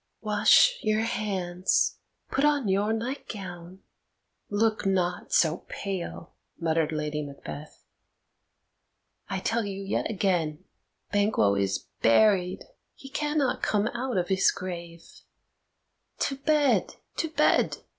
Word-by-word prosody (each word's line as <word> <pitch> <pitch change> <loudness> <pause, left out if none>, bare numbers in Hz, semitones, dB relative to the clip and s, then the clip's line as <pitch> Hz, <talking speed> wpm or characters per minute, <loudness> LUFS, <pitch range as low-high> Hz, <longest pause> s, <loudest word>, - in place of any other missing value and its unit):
"Wash 215 - +5
your 215 0 +1
hands; 190 -5 0 0.3
put 275 - +1
on 290 -5 +2
your 200 +3 +1
nightgown, 195 -7 -6 0.7
look 215 +1 +1
not 180 -2 0
so 160 0 +2
pale!" 185 -3 -5 0.3
muttered 160 -1 +1
Lady 150 -1 -2
Macbeth. 145 +1 -9 1.4
"I - - -1
tell 230 0 0
you 200 -1 -5
yet 195 - -1
again, 180 -6 0 0.5
Banquo 205 - +3
is 100 -1 -1 0.2
buried; 185 - +3 0.3
he 270 - -12
cannot 295 -2 0
come 210 -1 +1
out 250 -1 -3
of 180 +1 0
his 190 0 +4
grave. 170 -3 -6 1.2
To 275 - 0
bed, 290 +1 +2 0.2
to 325 - -1
bed! 305 0 +2
195 Hz, 110 wpm, -27 LUFS, 170-225 Hz, 1.4 s, Wash